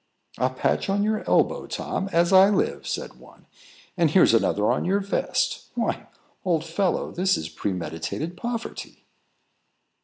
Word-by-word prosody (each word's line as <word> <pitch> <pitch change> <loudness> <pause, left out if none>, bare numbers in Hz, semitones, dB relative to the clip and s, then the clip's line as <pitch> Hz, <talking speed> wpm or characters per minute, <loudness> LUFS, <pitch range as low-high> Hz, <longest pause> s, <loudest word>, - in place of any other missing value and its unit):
"A 130 - +2
patch 130 +8 -1
on 200 +1 +1
your 215 0 0
elbow, - - +2
Tom, 195 - -3
as 170 +2 +3
I 190 +1 +8
live!" 205 - -1
said - - -5
one; - - -18 0.5
"and 170 -4 +3
here's 165 -5 +5
another 105 -2 +2
on - - 0
your 195 +3 +1
vest. 200 0 -1
Why, - - -2 0.4
old 165 -4 0
fellow, 175 +3 -1
this 190 +2 +1
is 80 - -5
premeditated 90 - -4
poverty." 235 +3 -6
175 Hz, 145 wpm, -24 LUFS, 130-195 Hz, 0.5 s, I